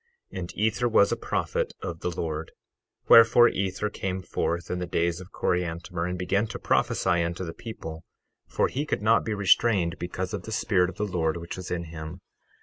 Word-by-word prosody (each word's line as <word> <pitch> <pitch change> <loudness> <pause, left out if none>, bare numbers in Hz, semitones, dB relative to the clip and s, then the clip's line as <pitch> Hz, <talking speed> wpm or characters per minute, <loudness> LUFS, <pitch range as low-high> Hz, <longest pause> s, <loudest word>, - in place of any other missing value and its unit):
12:2 95 - -4
And 85 -1 -7
Ether 110 +3 +1
was 100 -3 +4
a - - +2
prophet - - -2
of 85 -1 -4
the 90 - -2
Lord; 80 -2 -4 0.5
wherefore 115 +1 +8
Ether 95 +2 -2
came 95 -2 -3
forth 85 -1 -2
in 90 - -2
the 90 - -3
days 85 0 0
of 95 +1 -12
Coriantumr, 85 0 -2
and 90 - -3
began 100 +4 0
to - - -6
prophesy 85 - +1
unto 85 +2 -3
the 80 - -6
people, 80 -7 -8 0.4
for - - +1
he 140 - -2
could - - -2
not 115 +1 +4
be 110 - -2
restrained 100 -3 +3
because 90 +1 -4
of - - -3
the 110 - -8
Spirit 95 -4 +2
of - - -10
the 105 - 0
Lord 85 -4 -1
which 85 0 -6
was 95 -1 -7
in 85 -1 -2
him. 80 +1 -8
90 Hz, 200 wpm, -26 LUFS, 85-100 Hz, 0.5 s, wherefore